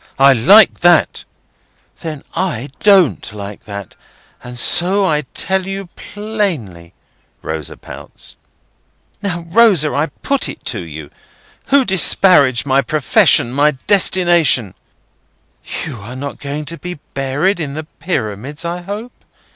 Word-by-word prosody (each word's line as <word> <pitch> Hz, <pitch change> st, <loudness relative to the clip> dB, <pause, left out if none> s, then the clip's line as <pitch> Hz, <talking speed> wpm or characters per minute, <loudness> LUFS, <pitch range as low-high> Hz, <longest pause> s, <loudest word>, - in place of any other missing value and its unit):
I 135 Hz, 0 st, +6 dB
like 195 Hz, -, +5 dB
that!" 175 Hz, -2 st, +3 dB, 0.7 s
"Then 155 Hz, -4 st, -7 dB
I 145 Hz, -8 st, -3 dB
don't 195 Hz, -, +3 dB
like 100 Hz, -1 st, -9 dB
that, 100 Hz, -2 st, -8 dB, 0.5 s
and 125 Hz, 0 st, -9 dB
so 190 Hz, +10 st, +4 dB
I 150 Hz, -5 st, 0 dB
tell 190 Hz, 0 st, 0 dB
you 195 Hz, -1 st, -6 dB
plainly," 175 Hz, -, -5 dB, 0.5 s
Rosa 80 Hz, -2 st, -5 dB
pouts. -, -, -10 dB, 0.9 s
"Now, 175 Hz, -4 st, -4 dB
Rosa, 190 Hz, -8 st, +4 dB
I 145 Hz, +3 st, 0 dB
put 275 Hz, +9 st, -2 dB
it -, -, -10 dB
to -, -, -3 dB
you. 80 Hz, -4 st, -9 dB, 0.6 s
Who 275 Hz, -1 st, +3 dB
disparaged 165 Hz, -, +4 dB
my 135 Hz, 0 st, +2 dB
profession, 135 Hz, -3 st, +2 dB
my 145 Hz, 0 st, +2 dB
destination—" 175 Hz, -, +3 dB, 1.1 s
"You 140 Hz, -8 st, -7 dB
are 110 Hz, +6 st, -9 dB
not 140 Hz, +2 st, -7 dB
going 145 Hz, +1 st, -5 dB
to 165 Hz, +2 st, -8 dB
be 180 Hz, 0 st, -6 dB, 0.2 s
buried 140 Hz, +8 st, -1 dB
in 145 Hz, -3 st, -4 dB
the 155 Hz, -, -5 dB
Pyramids, 145 Hz, -, -5 dB
I 175 Hz, +1 st, -4 dB
hope?" 205 Hz, +6 st, -7 dB
155 Hz, 125 wpm, -16 LUFS, 130-190 Hz, 1.1 s, I